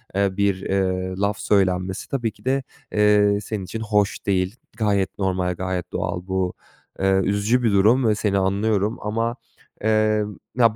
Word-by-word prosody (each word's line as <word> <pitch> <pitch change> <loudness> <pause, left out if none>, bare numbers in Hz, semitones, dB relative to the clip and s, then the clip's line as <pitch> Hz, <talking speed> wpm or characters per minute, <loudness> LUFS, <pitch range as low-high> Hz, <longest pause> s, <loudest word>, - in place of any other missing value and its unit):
eee, 100 -1 +1
bir, 100 -2 0
ııı, 95 -1 -1
laf 100 0 +1
söylenmesi 95 -2 +1
tabii 120 -5 -1
ki - - -24
de, 135 +1 +1 0.3
eee, 105 -1 +4
senin 105 -1 -4
için 110 +5 -6
hoş 105 -2 0
değil. 95 -1 0 0.2
Gayet 100 -4 0
normal, 95 -2 0
gayet 95 0 -3
doğal. 90 +1 -3
Bu, 95 -1 -1 0.5
eee, 95 0 +3
üzücü 100 +6 +1
bir 115 - +3
durum 110 +6 +4
ve 105 - +3
seni 105 -2 0
anlıyorum 100 +2 +1
ama, 115 +3 -1 0.5
eee, 110 0 +3 0.3
ya, 115 -3 +4
100 Hz, 155 wpm, -23 LUFS, 95-110 Hz, 0.5 s, eee